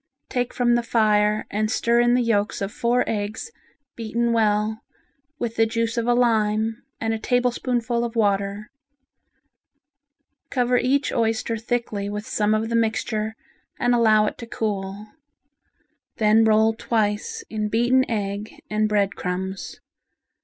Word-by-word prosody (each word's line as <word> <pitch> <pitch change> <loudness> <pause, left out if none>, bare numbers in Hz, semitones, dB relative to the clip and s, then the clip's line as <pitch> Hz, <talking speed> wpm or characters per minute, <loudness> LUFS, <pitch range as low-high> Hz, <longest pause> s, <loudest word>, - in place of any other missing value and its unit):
Take 245 -1 -1
from 240 -1 +2
the 240 - +3
fire 215 -2 +2
and 215 +1 0
stir 235 0 +2
in 240 0 +4
the 250 - +2
yolks 210 -3 0
of 195 0 -3
four 240 +3 +1
eggs 215 - -3 0.4
beaten 235 +1 -1
well 215 0 +1 0.6
with 235 -3 -4
the 225 0 +4
juice 230 +1 -1
of 235 -1 -1
a 240 - +4
lime 220 -2 +1 0.2
and 225 0 -1
a 225 - -3
tablespoonful 245 0 0
of 235 0 -4
water. 200 -1 0 1.8
Cover 250 -1 +1
each 275 +3 +1
oyster 225 -1 0
thickly 225 -3 -2
with 210 +1 -5
some 210 0 +1
of 220 +1 -1
the 230 - -1
mixture 220 -1 -1 0.4
and 245 0 +2
allow 220 -3 +4
it - - -4
to 235 - -7
cool. 205 -2 -3 1.1
Then 220 +1 +4
roll 220 0 +4
twice 215 -2 -1
in 215 -1 -2
beaten 240 +4 +3
egg 205 -1 -3 0.2
and 215 0 +1
bread 200 -1 +1
crumbs. 190 +1 -5
220 Hz, 140 wpm, -23 LUFS, 210-235 Hz, 1.8 s, in